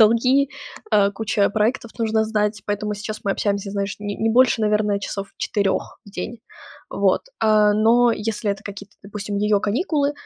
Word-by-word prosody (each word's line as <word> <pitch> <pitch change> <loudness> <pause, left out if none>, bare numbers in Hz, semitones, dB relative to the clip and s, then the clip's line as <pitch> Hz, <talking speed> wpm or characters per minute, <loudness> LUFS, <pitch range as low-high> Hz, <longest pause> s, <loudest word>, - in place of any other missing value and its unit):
долги, 250 +5 +4 0.4
э, 200 -1 +4
куча 205 -1 0
проектов, 220 +3 0
нужно 220 -1 +1
сдать. 210 -2 -1
Поэтому 210 0 -2
сейчас 215 +1 -6
мы 200 - +1
общаемся, 200 -1 -2
знаешь, 200 -1 -3
не 205 -1 -5
не 225 - +1
больше, 245 -1 +4
наверно, 210 -1 +1
часов 200 0 -5
4 200 -3 -1
в 200 - -14
день. 230 +3 -6 0.5
Вот, - - +1 0.2
э, 215 -1 +5
но 230 +3 +4
если 215 0 -2
это 200 +1 -4
какие-то, 200 0 -9
допустим, 205 0 -5
ее 210 0 +2
каникулы, 285 - 0
210 Hz, 165 wpm, -22 LUFS, 205-225 Hz, 0.5 s, э